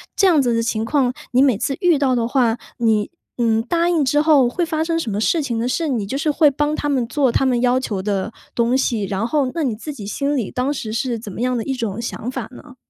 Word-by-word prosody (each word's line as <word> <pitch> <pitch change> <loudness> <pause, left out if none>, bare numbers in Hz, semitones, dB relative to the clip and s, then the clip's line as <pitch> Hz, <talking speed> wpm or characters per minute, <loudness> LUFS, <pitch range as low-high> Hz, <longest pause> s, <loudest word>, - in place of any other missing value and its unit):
这 395 - +3
样 325 -6 +4
子 240 -3 +1
的 230 - +1
情 225 -1 -1
况， 255 -1 +1 0.2
你 250 - +4
每 265 -6 +4
次 265 +5 -1
遇 350 -4 +4
到 270 -2 +2
的 230 -1 0
话， 240 -2 +2 0.2
你， 220 -3 +1 0.3
嗯， 225 -2 +2
答 340 +7 +1
应 325 -5 +2
之 295 +3 +3
后 300 -5 +5
会 345 +8 -1
发 315 -1 -1
生 330 0 -1
什 245 -9 -3
么 200 - -2
事 325 +8 +2
情 240 -5 -2
呢？ 235 - -1
是， 320 +6 -1
你 230 -7 -1
就 235 +7 -3
是 305 +2 0
会 295 0 +4
帮 295 +2 0
他 295 - -3
们 260 -4 0
做 265 +1 +1
他 270 - +1
们 250 -2 +1
要 250 +1 +3
求 210 -7 -3
的 200 +1 -2 0.2
东 235 +2 +2
西， 235 -5 0
然 195 +2 -2
后 275 -1 0
那 330 - 0
你 245 -6 -1
自 295 +7 -7
己 220 -8 -8
心 280 +8 -1
里 230 -7 -2
当 255 +3 -1
时 220 -6 -5
是 235 +1 -1
怎 215 -2 -8
么 220 - -6
样 250 0 0
的 225 - -2
一 270 - -2
种 225 -5 -3
想 235 0 -5
法 255 - -4
呢？ 250 0 -13
255 Hz, 295 characters per minute, -20 LUFS, 230-290 Hz, 0.3 s, 后